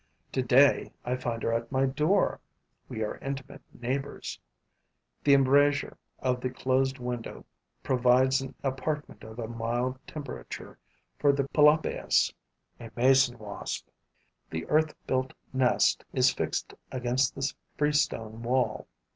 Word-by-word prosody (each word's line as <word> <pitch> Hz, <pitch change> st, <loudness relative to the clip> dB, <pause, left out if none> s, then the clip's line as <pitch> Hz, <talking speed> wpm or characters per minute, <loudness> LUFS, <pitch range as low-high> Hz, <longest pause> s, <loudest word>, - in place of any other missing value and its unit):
Today, 130 Hz, +2 st, +4 dB
I 125 Hz, -, 0 dB
find 120 Hz, -3 st, -3 dB
her 115 Hz, -, +1 dB
at 115 Hz, 0 st, -2 dB
my 135 Hz, 0 st, +2 dB
door; 150 Hz, +9 st, +2 dB, 0.5 s
we 110 Hz, -, -3 dB
are 105 Hz, -, -4 dB
intimate 135 Hz, -1 st, -6 dB
neighbors. 135 Hz, +3 st, -4 dB, 0.8 s
The 140 Hz, -1 st, +6 dB
embrasure 140 Hz, +1 st, +3 dB, 0.2 s
of 125 Hz, -1 st, -1 dB
the 130 Hz, -, -1 dB
closed 130 Hz, +1 st, 0 dB
window 125 Hz, -2 st, -5 dB, 0.4 s
provides 130 Hz, +1 st, +3 dB
an 135 Hz, -1 st, -7 dB
apartment 140 Hz, +3 st, -3 dB
of 110 Hz, +1 st, -10 dB
a 115 Hz, -2 st, -4 dB
mild 120 Hz, +3 st, -2 dB
temperature 145 Hz, -4 st, -8 dB, 0.4 s
for 145 Hz, -, +5 dB
the 140 Hz, -1 st, -1 dB
Pelopaeus 150 Hz, +1 st, +3 dB, 0.5 s
[a 115 Hz, -1 st, -8 dB
mason 130 Hz, 0 st, +4 dB
wasp]. 105 Hz, -2 st, -6 dB, 0.6 s
The 80 Hz, 0 st, -4 dB
earth 155 Hz, 0 st, +2 dB
built 130 Hz, 0 st, -1 dB, 0.2 s
nest 125 Hz, -, +3 dB
is -, -, +4 dB
fixed -, -, -3 dB, 0.2 s
against 125 Hz, +1 st, 0 dB
the 140 Hz, +1 st, -1 dB, 0.2 s
freestone 145 Hz, -7 st, 0 dB
wall. 125 Hz, +2 st, 0 dB
130 Hz, 125 wpm, -28 LUFS, 120-140 Hz, 0.8 s, The